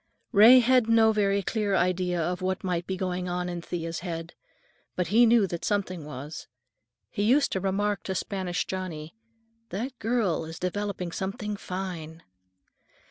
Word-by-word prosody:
Ray 235 +5 +8
had 245 -1 +3
no 225 -1 +5
very 200 -2 +1
clear 205 -1 0
idea 180 0 +1
of 180 +3 -2
what 185 +1 -2
might 175 -2 -2
be 190 - -2
going 180 -1 -2
on 180 0 -2
in 175 -1 -4
Thea's 165 -1 -4
head, 165 -1 -6 0.6
but 180 - -1
he 235 +3 +6
knew 225 -2 +5
that 170 -2 -5
something 185 -5 -1
was. 150 +2 -8 0.6
He - - -3
used 255 +8 +3
to 190 - 0
remark 200 +2 0
to 190 - -2
Spanish 185 -1 -2
Johnny, 170 -4 -5 0.6
"That 235 +7 -5
girl 225 -7 0
is 160 0 -8
developing 185 -1 -3
something 205 +3 -4
fine." 175 -5 -6
185 Hz, 155 wpm, -27 LUFS, 175-210 Hz, 0.6 s, Ray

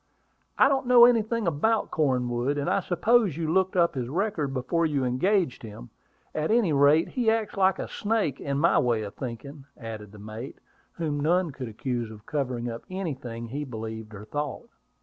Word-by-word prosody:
"I - - +6
don't 270 -2 0
know 245 -1 +9
anything 230 -2 +2
about 190 +8 +1
Cornwood; 130 -2 0
and 140 - -2
I - - +2
suppose 205 - +2
you 160 -1 -1
looked 190 0 +2
up 170 -2 +3
his 125 -3 -3
record 165 -4 -1
before 135 +6 -1
you 145 -5 +1
engaged 165 +5 +1
him. 105 - -10 0.4
At 155 0 -1
any 215 -8 +3
rate, 145 +3 +4
he 240 -4 +1
acts 225 -1 0
like 190 -1 +3
a - - -4
snake, 205 - -1
in 140 -1 -2
my 165 +4 +4
way 120 -5 +1
of 100 - -7
thinking," 135 +3 -7
added 110 -3 -8
the 105 - -13
mate, 110 +5 -8 0.4
whom 150 -3 -2
none 170 +3 +2
could 130 -2 -6
accuse 120 +1 -3
of 110 -1 -12
covering 125 -5 -2
up 115 -1 -5
anything 135 -11 -5
he 145 +5 -3
believed 110 -4 -7
or 105 +1 -9
thought. 145 +4 -4
145 Hz, 185 wpm, -26 LUFS, 120-185 Hz, 0.4 s, know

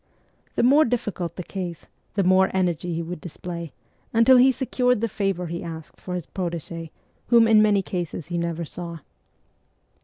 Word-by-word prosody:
The - - +2
more 280 +5 +6
difficult 210 - -2
the 180 - -5
case, 175 -3 -6 0.3
the 200 - +2
more 185 +1 +4
energy 175 -2 0
he 170 - -2
would 170 -1 -6
display, 170 -1 -7 0.4
until 230 +3 +6
he 260 +2 +7
secured 250 -2 +1
the 230 - 0
favour 195 -4 -1
he 170 +1 -5
asked 160 -2 -9
for 180 - -4
his 175 -4 -4
protege, 170 -2 -5 0.4
whom 230 -1 +6
in 220 -1 +6
many 205 -2 +3
cases 175 -3 -4
he 175 0 -3
never 170 0 -2
saw. 170 +1 -7
180 Hz, 165 wpm, -24 LUFS, 170-215 Hz, 0.4 s, he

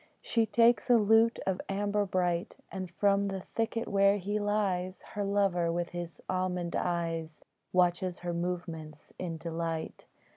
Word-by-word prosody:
She 230 -2 +1
takes 230 +2 +4
a 240 - +7
lute 225 +2 +4
of 190 -1 0
amber 205 +1 0
bright, 180 0 0
And 185 -2 -5
from 200 +2 +2
the 195 -1 -3
thicket 230 0 -1
where 200 0 +4
he 205 +2 -2
lies 195 -3 -1
Her 205 - -1
lover, 195 -4 +2
with 175 0 -2
his 175 -1 -6
almond 180 -2 -1
eyes, 165 -2 -2 0.3
Watches 180 0 +2
her 175 -1 -2
movements 170 -3 -5
in 170 -3 -3
delight. 165 0 -4
185 Hz, 145 wpm, -30 LUFS, 170-205 Hz, 0.3 s, a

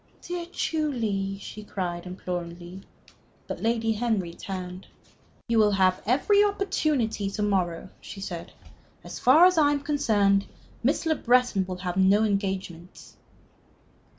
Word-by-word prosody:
"Dear 350 -1 -5
Julie!" 225 - -1
she 215 +1 -9
cried, 180 -3 -4
imploringly. 175 0 -6 0.6
But - - -6
Lady 225 0 +1
Henry 215 -6 -1
turned. 185 -1 -7 0.6
"You 230 -1 +2
will 210 -1 +4
have 185 -1 +2
every 400 - +4
opportunity 305 - 0
to 210 +1 -3
morrow," 185 -4 0
she 200 - -9
said. 175 -3 -6 0.5
"As - - -8
far 295 +8 +7
as 365 -2 +4
I 290 -1 +4
am 285 - -2
concerned, 205 -9 +2 0.3
Miss 280 +7 +1
Le 320 - +3
Breton 245 -8 +2
will 185 -1 -5
have 180 0 -2
no 195 +3 +4
engagements." 190 -4 -3
205 Hz, 130 wpm, -26 LUFS, 185-255 Hz, 0.6 s, far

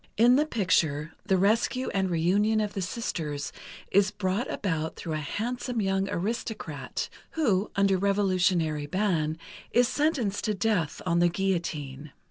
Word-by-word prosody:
In 240 +3 +6
the 300 +3 +3
picture, 165 - +1
the 190 - +3
rescue 225 +6 +2
and 190 -1 0
reunion 195 +6 +2
of 210 -1 -1
the 195 - -3
sisters 160 -8 -3 0.4
is 200 0 +4
brought 200 +5 -2
about 160 -5 -2
through 160 - -5
a - - 0
handsome 235 - -3
young 195 -1 0
aristocrat 220 +4 -3 0.3
who, 215 -11 +1
under 195 -2 +3
revolutionary 185 -6 +1
ban, 165 -4 0 0.3
is 245 0 +4
sentenced 265 -10 0
to 215 - 0
death 200 -5 0
on 170 -1 +2
the 175 0 +4
guillotine. 155 -7 -3
195 Hz, 140 wpm, -28 LUFS, 165-215 Hz, 0.4 s, In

